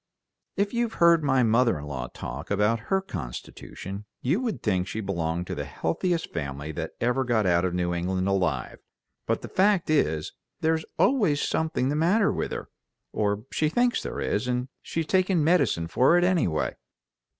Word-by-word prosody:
"If 200 +2 0
you've 235 -1 0
heard 170 -2 +5
my 135 -3 +3
mother 115 -2 +3
in 75 - -7
law 65 -4 -4
talk - - -7
about 105 +3 +2
her 190 0 +2
constitution 100 - -7 0.2
you 150 - +2
would 245 -4 -3
think 95 -4 +1
she 110 - -4
belonged 85 -4 -2
to - - -5
the - - -4
healthiest 170 - -2
family 70 -1 -4
that - - -5
ever 125 +2 +1
got 120 -4 +1
out 85 0 +3
of 90 -1 -1
New 90 -1 0
England 95 +2 -1
alive, 90 -10 -1 0.5
but - - 0
the - - -5
fact 190 -4 +2
is 80 - +1 0.3
there's 160 0 +1
always 205 - +3
something 160 -6 0
the 145 - 0
matter 190 +7 +3
with - - -3
her, - - -5 0.4
or 105 +1 0
she 155 - +1
thinks 245 +8 +2
there - - -5
is, 105 +5 -1
and 125 +1 -1
she's 165 -1 -3
taking 185 -2 +2
medicine 140 - +2
for 130 - +4
it, 175 - +3
anyway. 165 - +1
125 Hz, 175 wpm, -26 LUFS, -, 0.5 s, heard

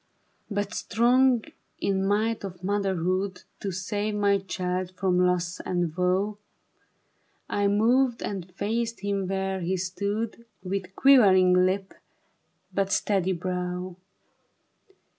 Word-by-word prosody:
But 205 0 -2
strong 245 +2 +3 0.4
in 195 -1 0
might 215 +3 0
of 185 -2 -8
motherhood 190 -1 -1 0.2
To 195 - -3
save 205 +3 -2
my 200 -1 +3
child 185 -1 -3
from 185 -2 +1
loss 180 -1 +1
and 175 -3 -2
woe, 190 +3 0 1.1
I 205 0 +1
moved 235 +4 +2
and 185 -3 -5
faced 230 +1 -2
him 200 -2 -1
where 190 0 -1
he 185 +2 -1
stood, 205 +5 -3 0.2
With 190 0 -4
quivering 195 -9 +6
lip 185 +2 +1 0.8
but 195 +1 0
steady 190 -3 +1
brov 180 0 -3
195 Hz, 110 wpm, -26 LUFS, 185-205 Hz, 1.1 s, quivering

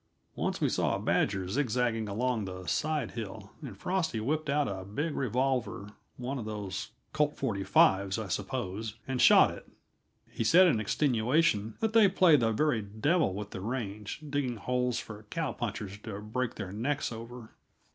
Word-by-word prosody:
Once - - -2
we - - +2
saw - - +1
a - - -3
badger 95 -2 +1
zigzagging 120 -1 0
along 110 -1 -1
a 90 -1 -8
side 150 -5 0
hill, 110 -3 -7
and 125 -10 -8
Frosty 165 - -1
whipped 150 +7 -1
out 145 0 +2
a 95 -2 -4
big 145 - -3
revolver 125 -4 -1 0.3
one 130 +2 -3
of 110 - -5
those 105 -4 -4 0.2
"Colt 150 -1 +1
45's," 100 -4 +3
I 110 -2 -4
suppose 110 0 -3
and 130 -2 -1
shot - - +7
it; - - -11 0.6
he - - -2
said 175 +11 +7
in 150 -11 +3
extenuation 115 0 +1
that 220 0 0
they 225 -3 +7
play 180 -4 +5
the 115 -5 +2
very 125 0 +1
devil 110 - +1
with 105 0 -6
the - - -6
range, 105 +2 -4
digging 140 -4 -1
holes 125 +2 0
for 105 -1 -8
cow 165 -3 -2
punchers 105 -3 -5
to 105 -2 -7
break 115 +3 -3
their 95 -4 -5
necks 125 +9 -1
over. 115 0 -9
115 Hz, 165 wpm, -30 LUFS, 105-140 Hz, 0.6 s, shot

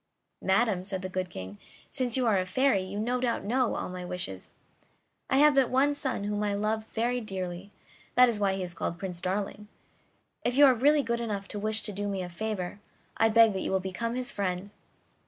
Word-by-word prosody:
"Madam," 195 -1 +2
said 190 -1 -3
the 185 - -3
good 185 -1 -3
King, 95 - -8 0.3
"since 255 -2 0
you 255 - +1
are 210 -4 +3
a - - +1
fairy 255 0 +2
you 190 +2 -5
no 245 +3 0
doubt 240 -2 0
know 245 +3 +1
all - - -3
my 180 0 -6
wishes. 180 - -5 0.7
I 265 - +3
have 300 +1 +6
but 270 -2 +3
one 275 +3 +3
son 265 -7 -2
whom 205 0 -2
I 205 -1 0
love 215 +2 -1
very 240 +2 -1
dearly, 190 -2 -5 0.4
that 250 0 +7
is 230 -3 0
why 195 -2 +2
he 190 - -3
is 175 -1 -4
called 170 0 -3
Prince 180 -2 -5
Darling. 200 +2 -3 0.8
If 245 +2 0
you 290 - +9
are 265 - +7
really 285 +5 +4
good 235 -1 -1
enough 205 -4 -3
to 205 - -4
wish 215 +1 0
to 210 - -3
do 205 +1 -3
me 195 -2 -2
a 180 - -6
favor, 200 0 -4 0.4
I 225 - +4
beg 225 -1 +6
that 190 - -2
you - - -2
will 190 - +2
become 190 +6 -3
his 255 -1 -2
friend." 190 0 -3
205 Hz, 220 wpm, -29 LUFS, 185-240 Hz, 0.8 s, you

